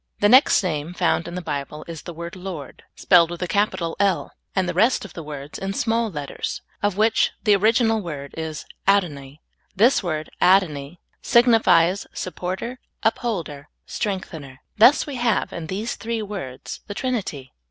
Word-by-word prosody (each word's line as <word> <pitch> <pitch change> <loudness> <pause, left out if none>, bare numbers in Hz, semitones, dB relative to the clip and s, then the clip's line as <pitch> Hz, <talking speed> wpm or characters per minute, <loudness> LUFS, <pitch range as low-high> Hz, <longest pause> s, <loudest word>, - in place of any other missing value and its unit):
The 205 - +4
next 255 -2 +6
name 165 -1 -3
found 170 -2 +1
in 170 - -6
the 180 - -4
Bible 150 0 -5
is 165 -2 -7
the 175 - -8
word 170 +2 -7
Lord, 180 -7 -8
spelled 170 -3 +5
with 175 -1 -6
a - - -2
capital 175 -3 0
I 200 - +5
38 - - +6
SOUL 190 - +1
FOOD. - - -6
"L," - - -19 0.2
and 190 -2 +1
the - - -1
rest 230 0 +2
of 195 - -11
the 165 - -7
words 145 -1 -8
in 195 0 -3
small 230 +1 0
letters, 145 -6 -5 0.2
of 205 -2 0
which 220 +1 +3
the 210 -3 +5
original 225 +2 +3
word 145 -6 -7
is 160 -1 -5 0.2
adoni. 150 -8 0 0.3
This 235 +7 +4
word 155 -5 -3
adoni 175 -5 +3 0.2
signifies 220 -7 +4
supporter, 190 +7 -4 0.2
upholder, 170 -11 -2 0.2
strengthener. 160 -10 -5
Thus 240 +7 +6
we 285 -3 -5
have, 240 -1 0
in 165 -2 -6
these 205 +7 -3
three 230 -1 -3
words, 190 -12 -7
the 205 - -6
Trinity. 200 - -3
185 Hz, 175 wpm, -23 LUFS, 155-215 Hz, 0.3 s, next